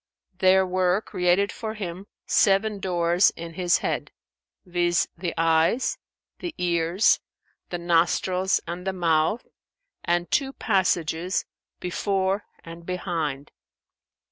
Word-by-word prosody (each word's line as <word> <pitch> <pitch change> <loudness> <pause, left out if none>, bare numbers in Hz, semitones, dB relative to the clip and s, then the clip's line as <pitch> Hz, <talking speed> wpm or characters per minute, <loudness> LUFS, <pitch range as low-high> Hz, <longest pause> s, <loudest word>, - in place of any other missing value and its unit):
There 190 0 +5
were 185 0 +1
created 185 0 +1
for 220 -1 -5
him 190 -1 -6 0.2
seven 205 +1 +3
doors 175 0 +3
in 165 0 -8
his 175 0 +2
head, - - -2 0.6
viz., 175 -1 +1
the 170 0 -3
eyes, 165 +9 +2 0.4
the 345 -2 -5
ears, 175 +2 +2 0.5
the 175 - -3
nostrils 175 +2 +1
and 175 +2 -6
the 190 - 0
mouth, 165 +4 +1 0.6
and 175 0 0
two 275 -2 +1
passages, 180 - 0 0.3
before 195 +2 -1 0.2
and 165 +1 -10
behind. 165 -6 -3
180 Hz, 110 wpm, -25 LUFS, 170-190 Hz, 0.6 s, There